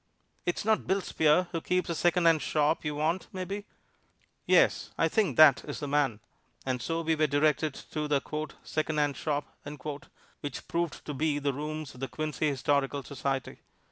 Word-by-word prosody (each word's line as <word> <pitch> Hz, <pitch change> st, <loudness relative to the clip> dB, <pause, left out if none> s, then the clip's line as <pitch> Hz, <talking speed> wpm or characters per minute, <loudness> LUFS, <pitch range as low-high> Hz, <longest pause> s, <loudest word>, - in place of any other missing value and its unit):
"It's 175 Hz, -, -1 dB
not 220 Hz, 0 st, +2 dB
Bill 195 Hz, +1 st, +2 dB
Spear 160 Hz, +1 st, +3 dB
who 165 Hz, -, -2 dB
keeps 180 Hz, +2 st, 0 dB
a 170 Hz, -, -1 dB
secondhand 170 Hz, -1 st, +3 dB
shop, 155 Hz, +1 st, +1 dB
you 150 Hz, -1 st, -2 dB
want, 160 Hz, +5 st, 0 dB
mebbe?" 190 Hz, +2 st, -4 dB, 0.8 s
"Yes; -, -, +4 dB
I -, -, +3 dB
think 220 Hz, -4 st, +1 dB
that 155 Hz, -4 st, +8 dB
is 145 Hz, -, -5 dB
the 145 Hz, -, -4 dB
man." 140 Hz, -7 st, +1 dB, 0.4 s
And 130 Hz, -2 st, -1 dB
so 165 Hz, +6 st, -1 dB
we 160 Hz, 0 st, +1 dB
were 155 Hz, 0 st, +2 dB
directed 150 Hz, 0 st, +2 dB, 0.2 s
to 150 Hz, -1 st, -2 dB
the 145 Hz, -2 st, +2 dB, 0.4 s
"secondhand 150 Hz, -2 st, 0 dB
shop," 145 Hz, 0 st, -1 dB, 0.9 s
which 145 Hz, -2 st, -6 dB
proved 170 Hz, -1 st, -2 dB
to 150 Hz, -, -4 dB
be 150 Hz, +1 st, 0 dB
the 140 Hz, -1 st, 0 dB
rooms 150 Hz, +1 st, -5 dB
of 125 Hz, -, -13 dB
the 135 Hz, -, -2 dB
Quincy 155 Hz, +4 st, -2 dB
Historical 140 Hz, 0 st, 0 dB
Society. 135 Hz, -1 st, -3 dB
150 Hz, 170 wpm, -29 LUFS, 145-165 Hz, 0.9 s, that